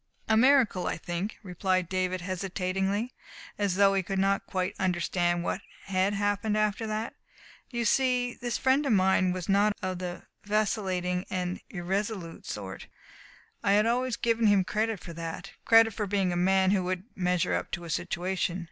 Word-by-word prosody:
"A 220 Hz, -, +3 dB
miracle, 235 Hz, -6 st, +4 dB
I -, -, -1 dB
think," 175 Hz, +5 st, -4 dB
replied 185 Hz, -1 st, 0 dB
David 185 Hz, 0 st, -1 dB
hesitatingly, 190 Hz, +4 st, -2 dB, 0.5 s
as 200 Hz, -3 st, +1 dB
though 195 Hz, 0 st, +5 dB
he 195 Hz, -, +2 dB
could 195 Hz, +1 st, -3 dB
not 195 Hz, +1 st, +1 dB
quite 185 Hz, -1 st, -1 dB
understand 175 Hz, -1 st, 0 dB
what 190 Hz, -, -2 dB, 0.2 s
had 195 Hz, +1 st, +1 dB
happened 205 Hz, +1 st, 0 dB
after 215 Hz, +1 st, 0 dB
that. 215 Hz, +1 st, -3 dB, 0.6 s
"You 235 Hz, -2 st, -2 dB
see, 250 Hz, 0 st, +2 dB
this 240 Hz, -2 st, -3 dB
friend 265 Hz, +3 st, +3 dB
of 245 Hz, -, +3 dB
mine 185 Hz, -1 st, +3 dB
was 180 Hz, -1 st, -4 dB
not 205 Hz, +1 st, +3 dB
of 185 Hz, -1 st, -2 dB
the 180 Hz, -1 st, -5 dB, 0.2 s
vacillating 190 Hz, -4 st, 0 dB
and 180 Hz, -1 st, -3 dB
irresolute 190 Hz, -1 st, -3 dB
sort. 95 Hz, -2 st, -6 dB, 0.8 s
I 200 Hz, -, +3 dB
had 210 Hz, +1 st, +4 dB
always 245 Hz, +1 st, 0 dB
given 230 Hz, -1 st, +2 dB
him 200 Hz, -2 st, +5 dB
credit 215 Hz, +2 st, -1 dB
for 170 Hz, -, -9 dB
that 165 Hz, 0 st, -6 dB
credit 225 Hz, -1 st, +6 dB
for 210 Hz, -1 st, -3 dB
being 195 Hz, -2 st, +1 dB
a -, -, -2 dB
man 190 Hz, +1 st, +3 dB
who 195 Hz, -2 st, +2 dB
would 185 Hz, 0 st, -2 dB
measure 180 Hz, -, +1 dB
up 85 Hz, +1 st, -1 dB
to 175 Hz, -, -3 dB
a 170 Hz, -, -8 dB
situation. 180 Hz, +2 st, -1 dB
190 Hz, 170 wpm, -28 LUFS, 180-215 Hz, 0.8 s, credit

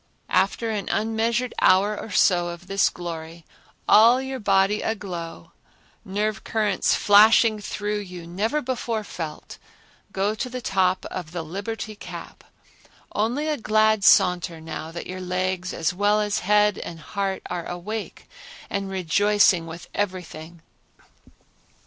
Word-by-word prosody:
After 225 Hz, +3 st, +1 dB
an 205 Hz, -3 st, -3 dB
unmeasured 225 Hz, +3 st, 0 dB
hour 200 Hz, +3 st, +4 dB
or 220 Hz, -, -7 dB
so 180 Hz, -3 st, +3 dB
of 175 Hz, +1 st, -8 dB
this 195 Hz, +1 st, +2 dB
glory, 165 Hz, -1 st, -8 dB, 0.4 s
all 230 Hz, +4 st, +7 dB
your 265 Hz, 0 st, -5 dB
body 195 Hz, 0 st, +2 dB
aglow, 175 Hz, -, -5 dB, 0.5 s
nerve 210 Hz, +2 st, -2 dB
currents 210 Hz, -4 st, +1 dB
flashing 215 Hz, +1 st, +5 dB
through 210 Hz, 0 st, -3 dB
you 180 Hz, -4 st, -8 dB
never 215 Hz, -, -1 dB
before 240 Hz, -3 st, -2 dB
felt, 160 Hz, -6 st, -7 dB, 0.5 s
go 200 Hz, +2 st, 0 dB
to 250 Hz, +4 st, -4 dB
the 255 Hz, +1 st, -5 dB
top 185 Hz, -5 st, +1 dB
of 175 Hz, -3 st, -6 dB
the 175 Hz, -2 st, -3 dB
Liberty 205 Hz, +6 st, -5 dB
Cap, -, -, -10 dB, 0.7 s
only 240 Hz, +9 st, 0 dB
a 305 Hz, -1 st, 0 dB
glad 215 Hz, -1 st, +2 dB
saunter 175 Hz, -3 st, +4 dB
now 160 Hz, 0 st, -7 dB
that 170 Hz, -, -7 dB
your 185 Hz, 0 st, -6 dB
legs 185 Hz, 0 st, -2 dB
as 165 Hz, -, -1 dB
well 205 Hz, +3 st, +2 dB
as 210 Hz, -1 st, 0 dB
head 210 Hz, +1 st, +3 dB
and 165 Hz, -, -7 dB
heart 195 Hz, +2 st, -3 dB
are 175 Hz, -2 st, -4 dB
awake 205 Hz, +5 st, -6 dB, 0.4 s
and 200 Hz, -1 st, -2 dB
rejoicing 190 Hz, 0 st, +2 dB
with 165 Hz, +1 st, -9 dB
everything. 170 Hz, -4 st, -5 dB
200 Hz, 135 wpm, -24 LUFS, 175-215 Hz, 0.7 s, all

